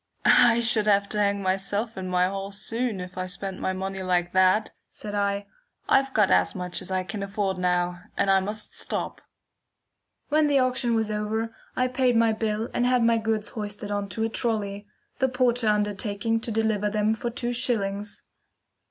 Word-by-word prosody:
"I 235 0 +6
should 225 -2 +2
have 200 -1 +4
to 210 - -2
hang 200 -1 +1
myself 195 +4 -1
in 190 -1 -5
my 180 0 +3
hall 195 +1 -4
soon 225 +1 -2
if 180 0 -7
I 185 - -2
spent 190 +1 -5
my 190 - -1
money 190 +1 -4
like 180 -1 0
that," 185 +3 +3 0.2
said 210 -1 -8
I. 200 0 0 0.4
"I've 270 0 +3
got 210 -6 +3
as - - +3
much 180 -1 -1
as - - -9
I 185 -1 0
can 200 +3 -6
afford 200 -1 -2
now, 180 0 0 0.2
and 195 - +2
I 195 - +5
must 210 +3 -4
stop." - - -3 1.1
When 305 0 +3
the 285 -1 +3
auction 255 -2 +1
was 220 -1 0
over, 220 +2 -2 0.2
I 255 - +2
paid 250 -1 +1
my 230 -1 +4
bill 220 0 -1
and 245 - +1
had 250 -1 +3
my 230 0 +3
goods 220 -1 -1
hoisted 205 -1 -5
on 205 -1 -2
to 220 +4 -3
a 225 - 0
trolly, 205 -3 -2 0.3
the 265 -1 +2
porter 245 -2 +1
undertaking 210 +1 0
to 225 - -3
deliver 215 -2 +1
them 210 +1 +1
for 230 +2 -3
two 240 0 -3
shillings. 205 -4 -2
210 Hz, 185 wpm, -26 LUFS, 195-230 Hz, 1.1 s, I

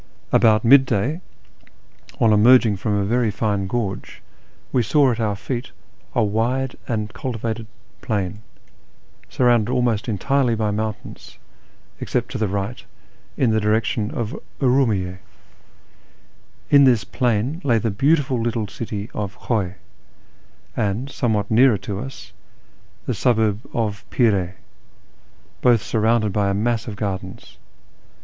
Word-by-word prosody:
About 110 0 +4
mid 135 +2 +7
day, 135 - -1 1.0
on 110 -2 +4
emerging 110 -1 +5
from 105 +1 -1
a 100 -1 0
very 120 +2 +1
fine 100 -2 -1
gorge, 100 -2 -4 0.5
we 125 - +2
saw 135 +3 +3
at 115 - -3
our 105 -3 0
feet 120 +5 -5 0.4
a 120 - +3
wide 120 +5 -1
and 110 -2 -3
cultivated 115 -2 -4 0.3
plain, 100 -2 -2 0.9
surrounded 120 -2 +2
almost 120 -3 0
entirely 120 +4 +1
by 110 -1 -1
mountains, 110 +1 -5 0.6
except 120 0 -2
to - - -4
the 110 - +1
right, 100 +5 -4 0.5
in 125 -4 +2
the 110 - +2
direction 105 0 0
of 120 -6 -4 0.2
Urumiyye. 110 -9 +1 1.5
In 140 -1 +7
this 120 -5 +4
plain 125 - -1
lay 120 -5 +3
the 115 0 -1
beautiful 135 +2 +1
little 115 -1 -1
city 105 0 -5
of 100 -2 -5
Khiiy, 100 -6 -1 1.0
and, 110 +7 -2
somewhat 110 -6 -1
nearer 120 0 +5
to 100 +1 -5
us, 135 +4 -9 0.7
the - - -1
suburb 110 -4 +1
of 110 -2 -2
Pir(^ 100 -7 +1 0.5
— - - -34
both 120 -4 +4
sur 110 - -2
rounded 110 -2 +2
by 100 -1 +1
a 100 - 0
mass 115 +2 -1
of 105 - -5
gardens. 95 -3 -6
110 Hz, 130 wpm, -21 LUFS, 105-125 Hz, 1.5 s, mid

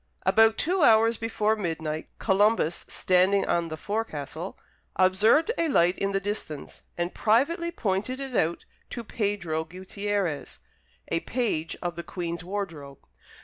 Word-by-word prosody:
About 220 +4 +5
two 360 +3 +1
hours 225 -3 +5
before 220 -1 0
midnight, 160 -5 -3
Columbus, 200 -4 +2
standing 185 +2 +2
on 170 -1 +1
the 160 -1 -6
forecastle, 175 -5 -4 0.4
observed 210 - +4
a 335 - +2
light 180 - +3
in 195 0 0
the 195 - +1
distance, 195 -7 -5 0.2
and 175 +1 -2
privately 305 - +2
pointed 215 - -2
it 270 -3 -5
out 165 -2 0 0.2
to 235 - -5
Pedro 200 -8 -2
Guttierez, 190 0 -3 0.5
a 165 - +1
page 190 -8 -2
of 175 -1 -2
the - - -2
Queen's 170 -1 -4
wardrobe. 170 -8 -6
195 Hz, 135 wpm, -27 LUFS, 170-225 Hz, 0.5 s, About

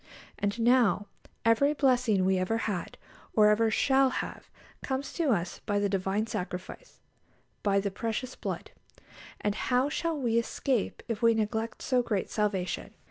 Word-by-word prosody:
And 205 +3 -1
now 230 -4 +4 0.4
every 280 +6 +4
blessing 245 -8 +3
we 190 0 +2
ever 185 +5 0
had, 190 -6 -3 0.4
or 210 -1 +6
ever 220 +1 +3
shall 265 +4 +3
have, - - -5 0.3
comes 265 +1 -3
to 330 -4 0
us 180 -7 0
by 205 -1 +1
the 205 0 +1
Divine 195 +2 0
Sacrifice, 185 - -6 0.6
by 200 -1 +2
"the 200 0 -2
precious 230 +5 -3
blood." - - -5 0.7
And 205 - +1
"How 250 +5 +1
shall 330 +1 -1
we 235 -3 +2
escape, 235 0 -1
if 230 -1 -3
we 230 -1 +5
neglect 220 +1 -2
so 255 -2 +2
great 210 -5 -2
salvation?" 200 -4 -2
225 Hz, 150 wpm, -29 LUFS, 200-255 Hz, 0.7 s, or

